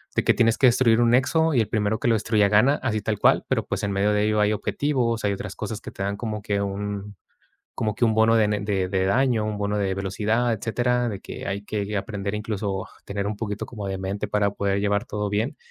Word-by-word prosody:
de - - +2
que - - +4
tienes 115 -1 +3
que 135 - +6
destruir 120 -1 +4
un 120 - +4
nexo. 160 +6 +3
Y 120 - +4
el 110 - -1
primero 110 0 0
que - - -1
lo - - +4
destruya 110 -1 +2
gana, 115 +8 +4
así 110 -4 0
tal 105 +1 -1
cual, - - +4
pero, - - 0
pues, - - -3
en 100 - -1
medio 100 +2 +1
de 105 0 +2
ello, 105 0 +1
hay 105 +1 +3
objetivos, 120 -1 -1
hay 100 - +2
otras - - -6
cosas - - -5
que - - -8
te 100 - -5
dan 100 +1 -1
como 105 0 -4
que 100 -2 -1
un 100 +1 -4 0.6
como 110 -2 -1
que - - +2
un 110 -1 +2
bono 110 +1 +4
de 110 -2 +4
ne 105 -1 0
de 100 -2 -1
de 95 0 0
daño, 120 +1 +2
un 105 -1 -3
bono 105 0 -1
de 95 -2 0
velocidad, 110 +5 0
etcétera, 120 +2 0
de 100 - -4
que - - -8
hay 100 +1 -3
que 105 0 -3
aprender, 100 0 -3
incluso, 105 -3 -3
a - - -19 0.2
tener 100 0 -3
un 105 0 -3
poquito 105 -2 -4
como 105 -4 -7
de 95 -1 -3
mente 100 +2 -3
para 105 0 +1
poder 100 -1 0
llevar 100 0 0
todo 105 0 -3
bien, 105 +5 -1
105 Hz, 250 wpm, -24 LUFS, 100-115 Hz, 0.6 s, que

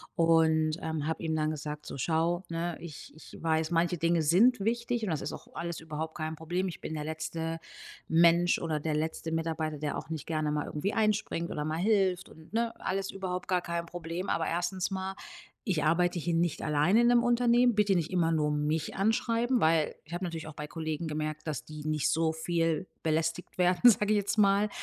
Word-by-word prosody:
und, 160 -1 +3
ähm, 160 -2 -3
habe 160 - -2
ihm 160 -1 -1
dann 155 0 0
gesagt, 150 0 -6
so: - - -6
„Schau, 165 +5 0
ne, 170 0 -3
ich 160 -3 -9
ich 160 - -13
weiß, 160 0 +1
manche 170 +1 +2
Dinge 170 0 +2
sind 200 +9 +4
wichtig 235 +2 -1
und 210 - -1
das 155 - -1
ist - - -4
auch - - -10
alles 170 -1 -4
überhaupt 160 0 -5
kein 155 -1 -3
Problem. 175 +4 -2
Ich 170 - -8
bin 160 - -6
der 150 - -3
letzte 160 +1 -4 0.5
Mensch 170 +1 +4
oder 160 -2 -2
der 155 +1 -2
letzte 160 +1 -2
Mitarbeiter, 160 -2 -2
der 150 0 -2
auch - - -8
nicht 160 -3 -5
gerne 155 -2 -1
mal 150 0 -1
irgendwie 170 +7 -2
einspringt 215 -6 0
oder 150 - -3
mal 155 +1 -2
hilft 190 -2 +2
und 160 +4 -16
ne, 230 0 0
alles 195 +1 -2
überhaupt 185 -2 -4
gar 180 -1 +2
kein 170 0 -3
Problem. 175 +2 -5
Aber 165 - 0
1. 175 +3 -1
mal, 190 0 -3 0.5
ich 180 - 0
arbeite 175 +3 +2
hier 170 +1 -1
nicht 170 -1 0
alleine 155 +9 +3
in 240 - +4
'nem 240 0 +5
Unternehmen. 240 0 +4
Bitte 205 -1 +3
nicht 165 -2 0
immer 170 -3 +2
nur 150 -2 +1
mich 150 +1 -1
anschreiben“, 230 +4 +1
weil 160 -1 +3
ich 160 +3 -12
habe 175 +2 -3
natürlich 165 -3 -4
auch 155 - -8
bei 150 - -5
Kollegen 160 0 -4
gemerkt, 155 0 -3
dass 150 -5 -3
die 155 -1 -9
nicht 155 -2 +1
so 160 +1 +2
viel 165 +1 0 0.2
belästigt 165 +2 -1
werden, 180 +7 +6
sage 210 +1 +1
ich - - +3
jetzt 205 +1 -1
mal, 200 0 +4
165 Hz, 210 wpm, -30 LUFS, 155-185 Hz, 0.5 s, werden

